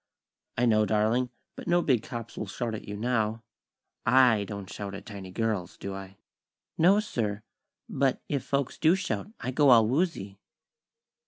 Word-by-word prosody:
"I 125 - +3
know, 110 -2 +3
darling; 110 +4 +2 0.3
but - - -9
no 175 0 +3
big 125 -6 +2
cops 115 0 -7
will 105 - -4
shout 115 +4 -3
at 110 - -7
you 105 0 -5
now. 110 -1 0 0.6
I 115 -4 +5
don't 100 -1 -7
shout 100 0 -6
at 100 - -9
tiny 100 -4 -8
girls, 105 -3 -2
do 100 - -5
I?" 95 0 -9 0.6
"No, 185 +5 +5
sir; 110 - -2 0.4
but 135 -1 +1
if 140 -2 -1
folks 140 -2 -2
do 165 +3 +5
shout, 190 +1 -3
I 130 - -3
go 145 +2 +4
all 115 -3 +7
woozy." 125 - -1
115 Hz, 165 wpm, -28 LUFS, 105-130 Hz, 0.6 s, all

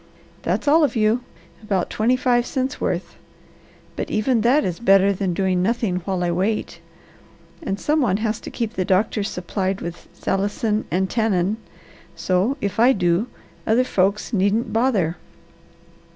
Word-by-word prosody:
That's - - -2
all 315 +3 +5
of 285 - +1
you 225 +2 +2 0.4
about 195 -4 -1
twenty 230 +4 +2
five 245 -1 +1
cents' 265 +1 -2
worth. - - -2 0.8
But - - -4
even 225 +2 +1
that 255 +7 +3
is 175 -2 -3
better 195 -2 +4
than 185 -2 -2
doing 185 -1 +1
nothing 215 -2 0
while 185 0 -2
I 175 - 0
wait, 195 +5 -1 0.8
and 200 -10 -3
some 305 +1 +1
one 200 -7 +2
has 220 0 -2
to - - -8
keep 230 -2 -3
the 190 - -1
doctors 205 +2 +1
supplied 190 +2 -3
with 170 0 -7
salicin 205 +2 -1
and 185 +5 0
tannin, 210 -2 0 0.6
so, 195 +9 0
if 200 +1 -2
I 245 +3 +6
do, 180 +2 +1 0.4
other 230 +3 +4
folks 200 -1 0
needn't 205 +3 +1
bother." 220 -9 +1
210 Hz, 150 wpm, -22 LUFS, 185-235 Hz, 0.8 s, I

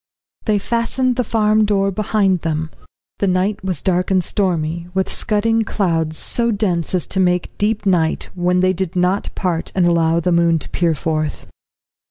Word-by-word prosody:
They 215 -2 +2
fastened 235 +4 0
the 250 - 0
farm 215 -1 +2
door 195 -1 +1
behind 195 -1 +1
them. 160 -1 -3 0.5
The 200 - +1
night 185 +3 0
was 185 -6 -3
dark 180 -1 +1
and 185 -2 +2
stormy, 170 -4 -1
with 190 0 0
scudding 225 +1 +1
clouds, 165 -7 -1
so 235 -1 -1
dense 190 -6 -1
as 180 - -1
to 190 - -3
make 180 -1 +1
deep 210 0 0
night, 170 -4 +1
when 180 0 +1
they 185 0 +3
did 185 0 -3
not 180 +2 +1
part 175 -3 -2
and 185 -2 +3
allow 170 -1 +2
the 180 +2 0
moon 170 -1 +3
to - - -7
peer 170 -2 +1
forth. 155 0 -2
185 Hz, 175 wpm, -19 LUFS, 170-205 Hz, 0.5 s, they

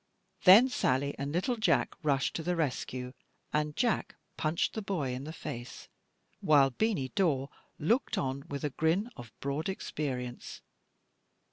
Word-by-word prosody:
Then 205 +8 +9
Sally 140 - 0
and 140 +1 -2
little 185 - 0
Jack 200 -7 +2
rushed 140 -4 +1
to - - -2
the 180 +2 -1
rescue, 130 -4 -2 0.4
and 150 0 0
Jack 240 -2 0 0.2
punched 160 +1 0
the 220 - -3
boy 170 -11 -2
in 130 +2 -5
the 155 - -5
face, 125 -5 -7 0.5
while 140 -3 +5
Beany 170 - 0
Dawe 145 -8 +1 0.3
looked 230 - +1
on 135 +1 -2
with 140 -1 -4
a 150 - -1
grin 165 - +1
of 120 -2 -10
broad 140 +6 -2
experience. 130 -9 -4
150 Hz, 145 wpm, -31 LUFS, 135-180 Hz, 0.5 s, Then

